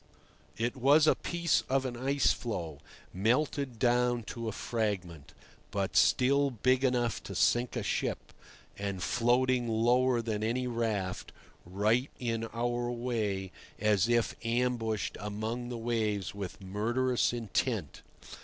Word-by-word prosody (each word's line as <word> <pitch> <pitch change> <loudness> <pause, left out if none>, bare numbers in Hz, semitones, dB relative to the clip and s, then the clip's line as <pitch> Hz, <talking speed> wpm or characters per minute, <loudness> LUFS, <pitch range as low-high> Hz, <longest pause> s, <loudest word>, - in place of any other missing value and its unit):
It 120 +3 -1
was 140 +4 +5
a - - +6
piece 170 -1 0
of 135 0 +1
an 125 -2 -3
ice 135 +3 +2
floe 85 - -5 0.3
melted 125 +5 0
down 120 0 +2
to 115 -1 -5
a - - -1
fragment, 95 -10 -3 0.4
but - - -2
still 140 +2 +4
big 130 +2 +1
enough 125 -3 +1
to - - -8
sink 120 +1 +2
a - - -2
ship, - - -2 0.5
and 100 -2 -3
floating 125 +1 +2
lower 120 +2 +2
than 110 -2 -2
any 120 +3 0
raft, 110 -6 -2 0.4
right 110 +8 +1
in 115 -2 -2
our 120 +1 -2
way, 110 -6 -2 0.3
as 105 0 +2
if 120 -1 +2
ambushed 115 -2 -1
among 110 +4 -4
the 120 - -4
waves 110 -4 -1
with 100 -1 -6
murderous 120 +6 0
intent. 115 - -2
120 Hz, 130 wpm, -31 LUFS, 105-125 Hz, 0.5 s, a